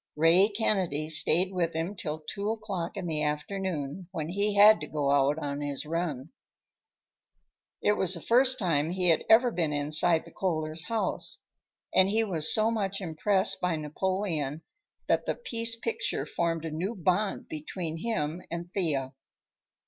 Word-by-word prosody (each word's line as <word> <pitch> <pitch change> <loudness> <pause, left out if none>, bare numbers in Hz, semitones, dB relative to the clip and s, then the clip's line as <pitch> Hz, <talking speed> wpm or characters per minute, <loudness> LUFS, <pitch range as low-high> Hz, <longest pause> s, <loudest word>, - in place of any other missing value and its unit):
Ray 170 +6 +5
Kennedy 185 -8 0
stayed 175 +4 +4
with 170 -2 -1
him 165 +5 -3
till 155 -3 -4
two 200 +6 -4
o'clock 205 -6 -4
in - - -4
the 155 -3 -2
afternoon, 155 +1 -3
when 160 -4 -4
he 200 +3 0
had 210 +2 +7
to - - -6
go 145 -2 -1
out 140 +1 +3
on 145 -2 -4
his 145 0 -4
run. 160 -3 -3 1.5
It - - +4
was 190 -3 +2
the - - -6
first 255 - +3
time 165 - +1
he 180 0 +1
had 165 - +3
ever 240 +2 +6
been 165 -7 0
inside 155 +3 +2
the - - -14
Kohlers' 160 -2 -2
house, 225 -2 -1 0.5
and 190 +1 +4
he 220 +2 +2
was 165 -7 +1
so 220 +1 +3
much 195 -3 -2
impressed 190 +3 +1
by 180 -2 +1
Napoleon 160 -1 -2 0.4
that - - +1
the - - 0
piece 230 - -2
picture 460 - -3
formed 165 -1 -2
a 160 - -4
new 185 +9 -3
bond 190 +2 -1
between 160 +2 -5
him 165 -4 -2
and 170 +1 -6
Thea. 145 -9 -2
175 Hz, 160 wpm, -28 LUFS, 155-200 Hz, 1.5 s, had